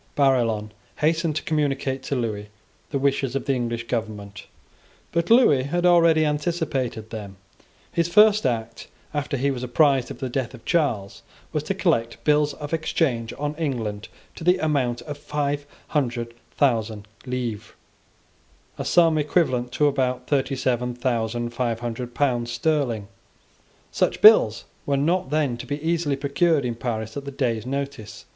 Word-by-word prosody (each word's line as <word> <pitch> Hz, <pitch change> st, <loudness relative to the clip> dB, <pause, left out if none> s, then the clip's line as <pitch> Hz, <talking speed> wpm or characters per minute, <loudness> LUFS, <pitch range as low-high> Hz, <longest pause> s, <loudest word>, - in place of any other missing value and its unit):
Barillon 115 Hz, -6 st, +2 dB, 0.2 s
hastened 160 Hz, 0 st, +1 dB
to 155 Hz, -, -2 dB
communicate 140 Hz, -5 st, -1 dB
to 140 Hz, -, -3 dB
Lewis 110 Hz, -4 st, -3 dB, 0.4 s
the 140 Hz, -, -1 dB
wishes 135 Hz, -1 st, 0 dB
of 135 Hz, -, -2 dB
the 135 Hz, -, +1 dB
English 120 Hz, -2 st, -2 dB
government; 105 Hz, -3 st, -5 dB, 0.6 s
but 170 Hz, 0 st, 0 dB
Lewis 225 Hz, -, +5 dB
had 175 Hz, +4 st, 0 dB
already 165 Hz, -3 st, +5 dB
anticipated 150 Hz, -7 st, -2 dB
them. 100 Hz, -4 st, -7 dB, 0.5 s
His 170 Hz, -1 st, +1 dB
first 210 Hz, +3 st, +5 dB
act, 115 Hz, -1 st, -3 dB, 0.3 s
after 145 Hz, -1 st, -2 dB
he 140 Hz, +2 st, +1 dB
was 125 Hz, -2 st, -4 dB
apprised 130 Hz, +1 st, +2 dB
of -, -, -7 dB
the 130 Hz, -, -3 dB
death 130 Hz, 0 st, -3 dB
of 115 Hz, -, -16 dB
Charles, 120 Hz, -, 0 dB, 0.3 s
was -, -, 0 dB
to -, -, -1 dB
collect 115 Hz, 0 st, 0 dB
bills 150 Hz, -1 st, +2 dB
of 145 Hz, +2 st, -7 dB
exchange 135 Hz, -8 st, 0 dB
on 145 Hz, +1 st, -2 dB
England 115 Hz, -10 st, -3 dB, 0.3 s
to -, -, -7 dB
the 180 Hz, +2 st, +4 dB
amount 135 Hz, -7 st, 0 dB
of 145 Hz, -2 st, -7 dB
five 145 Hz, -1 st, -2 dB, 0.2 s
hundred 120 Hz, -5 st, -1 dB, 0.2 s
thousand 110 Hz, -7 st, +1 dB, 0.2 s
livres, 120 Hz, -5 st, -4 dB, 1.1 s
a -, -, -3 dB
sum 165 Hz, -3 st, +4 dB
equivalent 135 Hz, -5 st, +1 dB
to 150 Hz, -, +2 dB
about 130 Hz, -3 st, 0 dB
thirty 135 Hz, -1 st, 0 dB
seven 125 Hz, -1 st, -1 dB
thousand 120 Hz, -1 st, -1 dB
five 120 Hz, -1 st, -1 dB
hundred 120 Hz, +1 st, -5 dB
pounds 120 Hz, -4 st, 0 dB
sterling 120 Hz, -6 st, 0 dB, 0.8 s
Such -, -, 0 dB
bills -, -, +7 dB, 0.2 s
were 140 Hz, -1 st, +2 dB
not 165 Hz, +2 st, +1 dB
then 145 Hz, -5 st, 0 dB
to 125 Hz, -, -8 dB
be 145 Hz, +2 st, -3 dB
easily 160 Hz, -2 st, 0 dB
procured 140 Hz, +1 st, +1 dB
in 120 Hz, -, -1 dB
Paris 110 Hz, -2 st, -4 dB
at 140 Hz, -1 st, -6 dB
day's 115 Hz, -4 st, -1 dB
notice. 140 Hz, -5 st, -5 dB
135 Hz, 150 wpm, -24 LUFS, 120-150 Hz, 1.1 s, bills